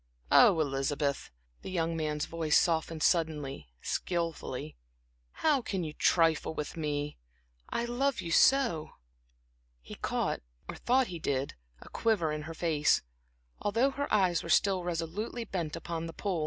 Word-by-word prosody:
Oh, 165 - +7
Elizabeth," 140 0 -1 0.3
the - - -7
young 165 -2 -1
man's 150 -2 -1
voice 165 -2 +2
softened 160 -2 0
suddenly, 150 - 0
skillfully 165 - -3 0.5
"how 290 - +1
can 195 -6 -3
you 155 -2 -5
trifle 165 -1 +2
with 150 - -4
me 150 - -3 0.5
so, - - -2
when 235 - 0
I 240 - -4
love 275 +2 +1
you?" 170 - +3 0.9
He - - -11
caught, - - -2 0.3
or - - -5
thought 260 +2 +3
he 170 - -5
did, 140 -2 -1 0.3
a - - -12
quiver 205 -9 +1
in 150 0 -3
her 165 - -7
face, 155 -3 +2 0.6
although 230 +7 +2
her 285 +1 -4
eyes 185 -5 +3
were 170 - -8
still 190 0 +3
resolutely 175 +8 -3
bent 170 -6 -3
upon 165 0 -4
the 165 - -8
pool. 190 -2 -2
165 Hz, 150 wpm, -30 LUFS, 150-195 Hz, 0.9 s, Oh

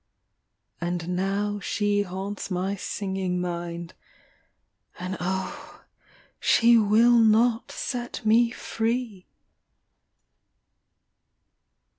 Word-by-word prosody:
And 175 0 -3
now 200 +2 -1
she 205 0 0
haunts 195 +2 -5
my 190 +2 -1
singing 190 -2 -3
mind 170 -1 -4 0.5
— - - -36
And 185 +1 -4
oh, 295 - -4 0.6
she 235 0 +5
will 230 +2 +5
not 225 +1 +3
set 240 -2 -5
me 230 +2 +5
free 225 -4 -3
205 Hz, 80 wpm, -26 LUFS, 185-230 Hz, 0.6 s, she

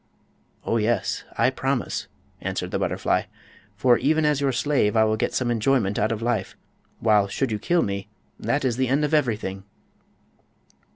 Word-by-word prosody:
"Oh, 115 - +1
yes; 110 -2 0
I 115 +3 +3
promise," 130 -1 -2 0.3
answered - - -3
the - - -1
butterfly; - - 0 0.5
"for 120 +3 +4
even 155 +2 +2
as 150 -2 +2
your 140 -1 +2
slave 130 -5 +1
I 110 - +6
will 110 0 +2
get 110 - -2
some 125 -2 0
enjoyment 115 -3 +1
out 110 +2 +1
of 115 0 -3
life, 115 -5 -1 0.4
while 105 -3 +3
should 115 +5 -2
you 105 - -1
kill 175 +9 +2
me—that 105 +6 -4
is 120 -2 0
the 130 0 +1
end 140 +4 +2
of 150 - -3
everything!" 110 -9 0
115 Hz, 165 wpm, -24 LUFS, 105-135 Hz, 0.5 s, I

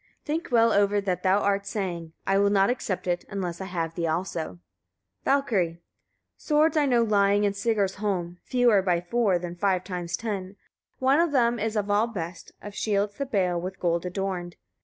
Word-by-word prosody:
Think 315 +3 -2
well 230 -1 +4
over 205 0 +3
what 190 -3 -2
thou 190 +2 +3
art 200 0 0
saying. 175 -6 -4
I 195 0 +2
will 200 0 +4
not 200 +2 +3
accept 215 -7 -3
it, 175 -1 -1
unless 185 -3 -4
I - - -4
have 165 -3 -3
thee 170 -1 -2
also. 160 - -3 0.7
Valkyria. 225 -12 +2
8. 170 - -22 0.6
Swords 305 +1 +2
I 295 -2 +3
know 240 -3 +3
lying 205 -1 +3
in 200 -1 +2
Sigarsholm, 200 -4 -1
fewer 245 -5 +3
by 180 -2 +1
four 195 +1 +1
than 175 0 -6
five 185 0 +1
times 175 -2 -4
ten: 200 -4 -4 0.4
one 265 +3 +3
of 340 -2 +2
them 240 -3 +2
is 220 +1 -2
of 205 -1 0
all 210 +3 +3
the 230 - -11
best, 170 -2 -6
of 205 - -7
shields 205 +1 -1
the 280 - -2
bale, 180 -7 0
with 185 +1 -6
gold 170 -1 0
adorned. 180 -1 -3
200 Hz, 190 wpm, -26 LUFS, 180-225 Hz, 0.7 s, well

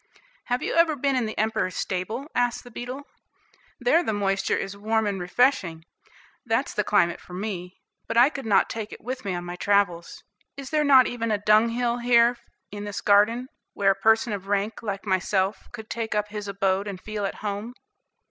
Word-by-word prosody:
"Have 245 0 -1
you - - -2
ever 335 -2 +4
been 275 0 0
in 245 -3 0
the 215 - -7
Emperor's 215 -4 0
stable?" 205 +8 -3
asked 245 -1 0
the 245 - -13
beetle. 250 +5 -6 0.8
"There - - +3
the 220 - -1
moisture 195 -1 0
is 195 0 -4
warm 220 +2 0
and 200 -3 -2
refreshing; 180 -5 +1 0.6
that's 240 +3 -1
the 210 - 0
climate 175 -4 +2
for 180 - -13
me, 185 -2 -5 0.3
but - - -2
I 250 +5 +6
could 270 -6 -6
not 205 - +4
take 220 -2 -5
it - - -11
with 255 +2 -5
me 195 -3 -2
on 175 0 -5
my 175 0 -5
travels. 195 -4 0 0.3
Is 275 0 -8
there 305 -1 +2
not 270 -3 +7
even 230 -1 -3
a 210 - +2
dunghill 230 +3 +2
here 240 0 +4 0.4
in 205 0 -6
this 205 0 -4
garden, 215 +5 +3 0.3
where 195 -1 +3
a - - 0
person 220 +4 +2
of 195 -1 -6
rank, 205 +2 -1
like 200 -3 -4
myself, 190 +1 0
could 220 0 -9
take 225 -2 -3
up 210 0 0
his 210 -1 -6
abode 195 0 0
and 195 -2 -5
feel 215 +1 -5
at 195 - -2
home?" 205 +4 -4
215 Hz, 195 wpm, -25 LUFS, 195-240 Hz, 0.8 s, not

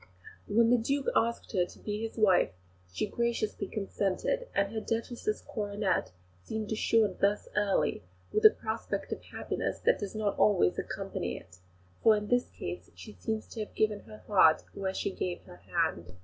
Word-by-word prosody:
When 230 +3 +4
the 245 - +5
Duke 275 +4 0
asked 235 +1 +1
her 185 -4 +3
to 175 - -8
be 210 0 -4
his 225 +1 -5
wife 195 - +4 0.4
she 90 - -1
graciously 235 -4 -1
consented, 205 - -1
and 200 +1 +1
her 220 - -2
Duchess's 235 - -2
coronet 205 - -1 0.3
seemed 220 - -4
assured 220 -2 +2
thus 200 +1 +2
early, 205 -2 +2 0.3
with 430 - +2
a 435 - +12
prospect - - -4
of - - -3
happiness - - -3
that - - +3
does 205 0 -5
not 210 -2 -1
always 190 - +4
accompany - - -3
it; 90 0 -14 0.4
for 220 -1 +6
in 210 0 -4
this 245 0 +2
case 90 +1 -6
she 90 +3 -10
seems 215 - -3
to 230 - -8
have 215 - -5
given 215 -1 +2
her 215 - -12
heart 175 -6 +5
where 195 -1 -2
she - - -1
gave 180 -1 -3
her 90 - -13
hand. 90 -1 -1
210 Hz, 175 wpm, -30 LUFS, 190-225 Hz, 0.4 s, a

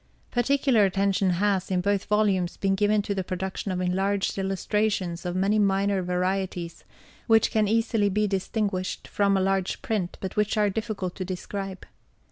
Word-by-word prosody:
Particular 255 -2 +3
attention 195 0 +2
has 190 +1 +1
in 185 -1 +1
both 200 +1 0
volumes 200 -4 +1
been 195 -1 +1
given 205 +1 +2
to 200 - -2
the 190 -1 -2
production 190 +2 -4
of 180 - -2
enlarged 190 +2 0
illustrations 195 -2 -1
of 175 - -3
many 200 +3 +2
minor 195 -1 +2
varieties, 180 -1 -2 0.4
which 225 -2 +4
can 215 -1 +2
easily 225 -1 +2
be 210 +2 +1
distinguished 195 -1 -2
from 200 -1 +2
a - - +1
large 190 -1 0
print, 200 -6 -2
but 190 -1 -5
which 210 +1 +1
are 210 -1 +3
difficult 200 -4 -3
to 190 - -3
describe. 190 +1 -5
195 Hz, 160 wpm, -26 LUFS, 185-210 Hz, 0.4 s, which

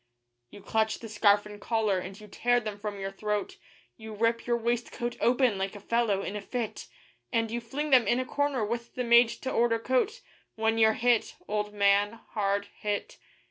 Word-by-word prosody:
You 205 - -13
clutch 220 0 0
the 230 - -9
scarf 210 -1 +3
and 210 -1 -10
collar, 220 -5 +1
and 190 +2 -8
you 210 - -12
tear 245 +4 +1
them 215 -3 -6
from 205 -1 -5
your 195 0 -4
throat, 210 - -3 0.4
You 220 -1 -9
rip 230 +2 0
your 240 -1 +2
waistcoat 240 +1 -2
open 245 -4 +3
like 195 +2 -2
a - - -8
fellow 210 -2 0
in 200 - -4
a 210 - -4
fit; 230 +1 -4 0.4
And 230 -2 0
you 240 +1 -2
fling 290 +6 -4
them 250 -3 +6
in 240 - +2
a 255 - -1
corner 280 -4 0
with 235 +2 -5
the 250 - -1
made 235 0 +6
to 260 +3 -5
order 230 -1 +2
coat, 260 - 0 0.3
When 225 0 +1
you're 220 -1 +5
hit, 235 0 +1
old 210 0 -2
man 200 +1 +3 0.2
hard 200 -1 0
hit. 205 -1 -3
225 Hz, 195 wpm, -28 LUFS, 205-240 Hz, 0.4 s, them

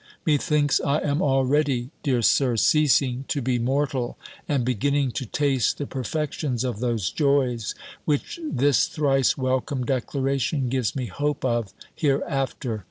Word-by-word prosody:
Methinks 150 -1 +2
I 140 +1 +2
am 145 +2 0
already, 135 -2 +1
dear 130 -5 +1
Sir, 125 0 +3
ceasing 135 -1 +3
to 145 - -1
be 125 -1 0
mortal, 130 0 -1 0.3
and 140 -5 +1
beginning 135 +3 +1
to 130 0 -4
taste 135 0 +1
the 145 - -3
perfections 135 -1 -3
of 125 -5 -3
those 115 -6 -1
joys, 135 -7 +1 0.3
which 150 - -1
this 145 - +2
thrice 135 -4 +1
welcome 130 0 -1
declaration 135 +1 -1
gives 125 -4 -1
me 130 -2 -2
hope 145 +3 -2
of 120 -5 0 0.2
hereafter! 135 -5 -1
135 Hz, 135 wpm, -24 LUFS, 125-145 Hz, 0.3 s, Sir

